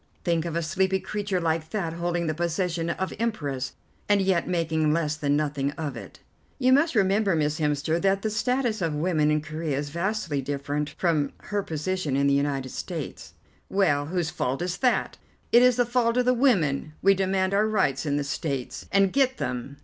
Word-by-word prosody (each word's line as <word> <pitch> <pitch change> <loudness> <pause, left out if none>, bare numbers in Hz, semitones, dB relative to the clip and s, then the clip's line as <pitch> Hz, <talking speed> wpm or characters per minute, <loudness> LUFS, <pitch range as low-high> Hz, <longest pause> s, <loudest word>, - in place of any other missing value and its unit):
Think 170 -2 +1
of 165 -1 -3
a 170 - 0
sleepy 190 +3 +1
creature 205 -2 -2
like 160 -1 -1
that 170 -5 -2
holding 170 0 -1
the 155 - 0
position 170 +1 -1
of 190 +2 -2
Empress, 145 - -2 0.4
and 205 -1 +5
yet 190 -3 +1
making 160 -3 +1
less 155 -2 0
than 145 -1 +1
nothing 145 -2 -1
of 155 -3 -4
it." - - -10 0.4
"You 255 -1 +4
must 285 +1 +3
remember, 200 -1 +3
Miss 150 0 0
Hemster, 150 +2 0
that 195 0 +2
the 220 - 0
status 245 -1 0
of 165 -3 0
woman 155 -1 +1
in 150 0 +2
Corea 155 -2 -3
is 145 +1 -3
vastly 170 -4 -1
different 145 +2 -3
from 155 -6 +1
her 205 0 -2
position 160 -3 -2
in 140 +1 +2
the 140 - +3
United 140 -2 0
States." - - -6 0.3
"Well, 145 -8 +2
and - - -9
whose 175 -3 -1
fault 135 +6 -2
is 180 0 -2
that? 250 -2 +1 0.3
It 235 - +7
is 250 -1 +5
the 245 - +2
fault 240 0 +1
of 250 - +3
the 250 - +4
women. 175 - +2
We 195 +1 +6
demand 190 0 0
our 210 +2 +3
rights 190 -11 +1
in 145 -2 0
the 145 - 0
States, 140 -2 -4
and 195 -1 +3
get 265 -1 +2
them. 125 +3 -4
170 Hz, 195 wpm, -26 LUFS, 150-195 Hz, 0.4 s, It